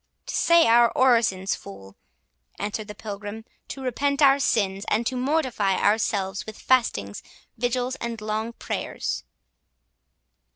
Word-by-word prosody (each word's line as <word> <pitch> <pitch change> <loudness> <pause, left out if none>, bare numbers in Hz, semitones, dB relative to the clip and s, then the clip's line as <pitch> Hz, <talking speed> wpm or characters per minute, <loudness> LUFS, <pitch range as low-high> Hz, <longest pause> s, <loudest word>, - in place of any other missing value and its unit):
"To - - -6
say 335 0 +5
our 235 +1 +5
orisons, 230 -7 +3
fool," 95 0 -10 0.6
answered 210 +1 -4
the 210 - -8
Pilgrim, 205 +1 -7 0.2
"to 270 - -7
repent 280 +3 0
our 275 0 +6
sins, 200 -7 0
and 225 +2 +1
to 260 - -1
mortify 250 -8 0
ourselves 200 -2 0
with 220 - -8
fastings, 105 - 0 0.3
vigils, 245 +2 -1
and 235 -1 -5
long 215 +2 -3
prayers." - - -4
225 Hz, 125 wpm, -25 LUFS, 200-255 Hz, 0.6 s, our